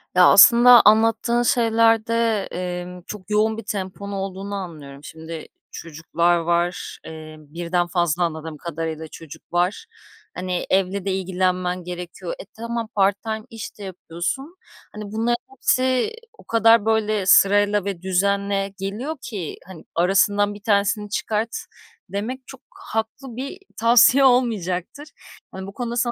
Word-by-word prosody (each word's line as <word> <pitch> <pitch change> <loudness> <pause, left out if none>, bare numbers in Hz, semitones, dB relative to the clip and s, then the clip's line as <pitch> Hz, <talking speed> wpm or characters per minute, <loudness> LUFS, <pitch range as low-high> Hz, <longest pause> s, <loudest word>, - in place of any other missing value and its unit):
Ya, 180 -1 +7
aslında 240 +4 +8
anlattığın 225 +2 +4
şeylerde, 230 -2 +2
emm, 180 0 -5
çok 200 -2 -9
yoğun 215 +1 +1
bir 225 - -6
temponun 200 -1 -5
olduğunu 195 +1 -5
anlıyorum. 150 -7 -8
Şimdi 160 0 -9 0.2
çocuklar 170 +2 -1
var, 170 +1 -1
eee, 155 -1 -9
birden 170 +3 -2
fazla 175 -1 0
anladığım 160 -2 -4
kadarıyla 160 -1 -5
çocuk 160 +1 -13
var. 180 - 0 0.5
Hani, 180 -1 -3
evle 195 +1 0
de 195 - 0
ilgilenmen 185 -1 -1
gerekiyor. 180 - -6
E, - - -8
tamam, 230 0 -5
part 195 0 +2
time 220 -1 -4
iş 225 -2 -8
de - - -8
yapıyorsun. 190 - -5 0.4
Hani, 210 0 -7
bunların 230 +2 0
hepsi 260 - +1 0.2
o - - -16
kadar, 225 -1 +4
böyle, 215 -3 +1
sırayla 205 +1 +4
ve 190 -4 -4
düzenle 195 +1 0
geliyor 235 +11 -4
ki, 200 -9 -6
hani, 180 -4 -11
"Αrasından 205 +3 +2
bir 205 - -12
tanesini 205 -1 +1
çıkart." 220 +2 -2 0.5
demek 235 +7 -4
çok - - -12
haklı 225 +3 -5
bir 275 +8 -6 0.2
tavsiye 240 +4 +5
olmayacaktır. 235 - +1 0.4
Hani, 190 0 -7
bu 200 - -9
konuda 240 0 -4
sana 240 0 +1
200 Hz, 135 wpm, -22 LUFS, 180-225 Hz, 0.5 s, aslında